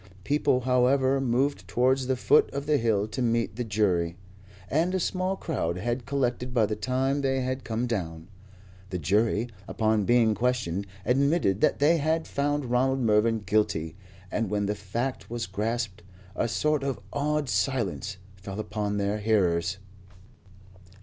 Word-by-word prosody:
People, 140 Hz, 0 st, +2 dB
however, 130 Hz, +2 st, +3 dB
moved 135 Hz, +3 st, 0 dB
towards 130 Hz, +1 st, +2 dB
the 130 Hz, -, +1 dB
foot 125 Hz, -, +4 dB
of 140 Hz, 0 st, -3 dB
the 150 Hz, 0 st, +3 dB
hill 110 Hz, -4 st, +1 dB
to 130 Hz, -, -4 dB
meet 115 Hz, -4 st, 0 dB
the 120 Hz, -, -2 dB
jury, 95 Hz, -6 st, 0 dB, 0.5 s
and 170 Hz, +6 st, +1 dB
a -, -, +1 dB
small 185 Hz, +2 st, -1 dB
crowd 90 Hz, -, -2 dB
had 120 Hz, +5 st, -3 dB
collected 125 Hz, -2 st, -1 dB
by 115 Hz, -3 st, +4 dB
the 105 Hz, +1 st, -2 dB
time 130 Hz, +5 st, 0 dB
they 135 Hz, -1 st, +1 dB
had 130 Hz, +1 st, -3 dB
come 115 Hz, +2 st, -2 dB
down. 85 Hz, -8 st, -4 dB, 0.6 s
The 90 Hz, -, -3 dB
jury, 105 Hz, +7 st, +1 dB, 0.2 s
upon 110 Hz, -2 st, +1 dB
being 120 Hz, -1 st, +4 dB
questioned, 105 Hz, -5 st, -1 dB, 0.2 s
admitted 135 Hz, -, +2 dB
that -, -, +3 dB
they 155 Hz, +4 st, +4 dB
had 160 Hz, +2 st, 0 dB
found 145 Hz, 0 st, -1 dB
Ronald 130 Hz, +2 st, +2 dB
Mervyn 110 Hz, 0 st, +3 dB
guilty, 80 Hz, -7 st, 0 dB, 0.4 s
and 115 Hz, -4 st, -1 dB
when 105 Hz, -1 st, 0 dB
the 105 Hz, -, 0 dB
fact 115 Hz, +6 st, -4 dB
was 120 Hz, 0 st, -3 dB
grasped, 105 Hz, +1 st, -3 dB, 0.3 s
a -, -, 0 dB
sort 150 Hz, +5 st, +1 dB
of 135 Hz, -1 st, -2 dB
awed 150 Hz, 0 st, 0 dB
silence 105 Hz, -7 st, -1 dB, 0.2 s
fell 95 Hz, +2 st, -7 dB
upon 105 Hz, -1 st, -2 dB
their 100 Hz, +1 st, 0 dB
hearers. 95 Hz, -4 st, +1 dB
120 Hz, 155 wpm, -27 LUFS, 105-135 Hz, 0.6 s, foot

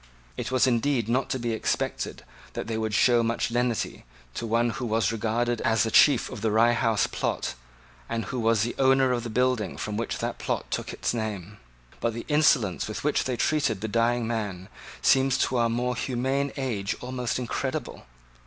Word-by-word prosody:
It -, -, -4 dB
was 130 Hz, 0 st, +3 dB
indeed 125 Hz, -1 st, +1 dB
not 125 Hz, +3 st, 0 dB
to -, -, -1 dB
be 120 Hz, -2 st, -2 dB
expected 110 Hz, -, -2 dB, 0.3 s
that -, -, -4 dB
they 115 Hz, -, -3 dB
would 110 Hz, -1 st, -1 dB
show 120 Hz, 0 st, +4 dB
much 115 Hz, +1 st, -1 dB
lenity 120 Hz, -1 st, -1 dB, 0.3 s
to 115 Hz, -, -4 dB
one 115 Hz, +1 st, +2 dB
who 125 Hz, -, -4 dB
was 110 Hz, -2 st, +1 dB
regarded 115 Hz, +2 st, -1 dB
as 115 Hz, 0 st, +2 dB
the 110 Hz, -, -1 dB
chief 145 Hz, -, +5 dB
of 120 Hz, -5 st, -7 dB
the 110 Hz, -, +1 dB
Rye 115 Hz, +3 st, +4 dB
House 115 Hz, -3 st, +2 dB
plot, -, -, -2 dB, 0.6 s
and 115 Hz, -2 st, -2 dB
who 125 Hz, -, -4 dB
was 115 Hz, -2 st, +2 dB
the 120 Hz, -, -2 dB
owner 135 Hz, -1 st, +4 dB
of 120 Hz, -1 st, 0 dB
the 120 Hz, -, -5 dB
building 125 Hz, -3 st, 0 dB
from 105 Hz, -1 st, -4 dB
which 115 Hz, -, -2 dB
that -, -, -4 dB
plot -, -, -3 dB
took -, -, -3 dB
its -, -, -2 dB
name: 105 Hz, -3 st, -4 dB, 0.4 s
but 115 Hz, -1 st, -1 dB
the 115 Hz, -, -6 dB
insolence 140 Hz, -, +3 dB
with 110 Hz, -, -5 dB
which 150 Hz, 0 st, +1 dB
they 125 Hz, -2 st, -2 dB
treated 140 Hz, -10 st, +1 dB
the 110 Hz, -, -2 dB
dying 115 Hz, +2 st, +1 dB
man 105 Hz, -5 st, -3 dB, 0.3 s
seems 135 Hz, 0 st, +4 dB
to 130 Hz, -, +1 dB
our 115 Hz, -1 st, +2 dB
more 125 Hz, +2 st, -1 dB
humane 130 Hz, +3 st, -1 dB
age 115 Hz, -8 st, -2 dB
almost 125 Hz, -1 st, -3 dB
incredible. 125 Hz, -, -4 dB
115 Hz, 190 wpm, -26 LUFS, 110-125 Hz, 0.6 s, chief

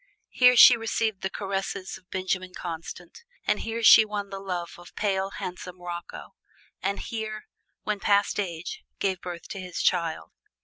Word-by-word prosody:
Here 250 Hz, 0 st, +6 dB
she 245 Hz, 0 st, +10 dB
received 225 Hz, -2 st, -1 dB
the 190 Hz, -, -1 dB
caresses 195 Hz, -1 st, -4 dB
of 185 Hz, -, -16 dB
Benjamin 185 Hz, -1 st, -2 dB
Constant, 170 Hz, -, -7 dB, 0.2 s
and -, -, +1 dB
here 225 Hz, +1 st, -4 dB
she 220 Hz, -, +10 dB
won 205 Hz, -2 st, -5 dB
the 195 Hz, -, -5 dB
love 180 Hz, -3 st, -4 dB
of 175 Hz, -, -14 dB
pale, 195 Hz, -2 st, 0 dB
handsome 180 Hz, -1 st, -6 dB
Rocco, 175 Hz, -1 st, -7 dB, 0.5 s
and 200 Hz, +1 st, -1 dB
here, 215 Hz, -1 st, -5 dB, 0.4 s
"when 210 Hz, -1 st, -2 dB
past 200 Hz, +1 st, +2 dB
age," 175 Hz, -3 st, -4 dB
gave 190 Hz, -2 st, -1 dB
birth 175 Hz, -2 st, -7 dB
to 195 Hz, -, -5 dB
his 180 Hz, -2 st, -4 dB
child. 170 Hz, -3 st, 0 dB
190 Hz, 160 wpm, -26 LUFS, 180-210 Hz, 0.5 s, she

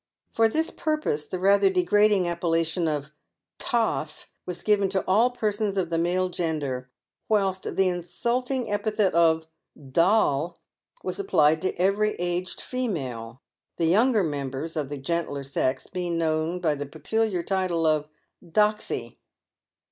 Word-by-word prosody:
Por 225 Hz, 0 st, +4 dB
this 320 Hz, +7 st, -1 dB
pur 310 Hz, -1 st, -1 dB
pose 150 Hz, -, -2 dB
the 185 Hz, -, -4 dB
rather 195 Hz, +1 st, +4 dB
degrading 190 Hz, +1 st, +3 dB
appellation 165 Hz, 0 st, 0 dB
of 150 Hz, -1 st, -2 dB, 0.3 s
" -, -, -63 dB
toff" 220 Hz, -10 st, 0 dB, 0.2 s
was 180 Hz, -1 st, -5 dB
given 205 Hz, -2 st, +3 dB
to 190 Hz, -1 st, -1 dB
all 220 Hz, +6 st, +4 dB
persons 210 Hz, -4 st, -1 dB
of 175 Hz, -3 st, -1 dB
the 165 Hz, -, +1 dB
male 180 Hz, +2 st, +1 dB
gender, 145 Hz, -8 st, -3 dB, 0.4 s
whilst 195 Hz, -3 st, 0 dB
the 190 Hz, -, +3 dB
insulting 235 Hz, +7 st, -1 dB
epithet 205 Hz, -1 st, +1 dB
of 160 Hz, -1 st, +3 dB, 0.2 s
" 135 Hz, -3 st, -16 dB
doll" 170 Hz, -4 st, +2 dB, 0.5 s
was -, -, -3 dB
applied 160 Hz, -, +3 dB
to 185 Hz, -, -1 dB
every 200 Hz, +4 st, +1 dB
aged 175 Hz, +1 st, -3 dB
female, 130 Hz, -, -4 dB, 0.3 s
the 165 Hz, -, +1 dB
younger 215 Hz, +5 st, +4 dB
members 145 Hz, 0 st, -3 dB
of 150 Hz, -4 st, -2 dB
the 145 Hz, -, -4 dB
gentler 145 Hz, 0 st, -2 dB
sex 130 Hz, -1 st, -1 dB
being 175 Hz, -2 st, -3 dB
known 160 Hz, +2 st, 0 dB
by 160 Hz, -4 st, +1 dB
the 145 Hz, 0 st, -5 dB
peculiar 180 Hz, +5 st, -1 dB
title 185 Hz, -4 st, 0 dB
of 155 Hz, -1 st, +1 dB, 0.2 s
" -, -, -28 dB, 0.2 s
doxy." 210 Hz, -, 0 dB
175 Hz, 150 wpm, -26 LUFS, 155-205 Hz, 0.5 s, Por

